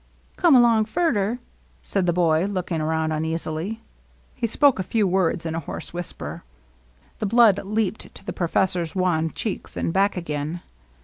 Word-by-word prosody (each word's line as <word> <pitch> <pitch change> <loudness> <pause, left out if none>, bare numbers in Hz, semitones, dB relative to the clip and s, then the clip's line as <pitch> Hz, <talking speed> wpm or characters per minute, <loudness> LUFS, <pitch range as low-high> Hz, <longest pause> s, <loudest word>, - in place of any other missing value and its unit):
^^Come 340 -6 +5
along 230 -3 +5
furder," 230 - 0 0.5
said 190 -3 -1
the - - +4
boy, 170 -1 +2
looking 180 -5 -2
around 160 0 0
uneasily. 160 +6 -3 0.5
He 240 -3 -2
spoke 270 +1 +3
a - - 0
few 210 +3 +1
words 180 -2 +1
in 160 - -2
a 165 - -1
hoarse - - -7
whisper. 175 0 -6 0.8
The 215 - -1
blood 220 -2 +5
leaped 215 +1 -2
to - - -13
the - - -4
professor's 175 -1 0
wan 175 -4 +1
cheeks, 210 +5 -5
and 165 - -1
back 195 0 +2
again. 155 0 -3
185 Hz, 160 wpm, -23 LUFS, 165-215 Hz, 0.8 s, ^^Come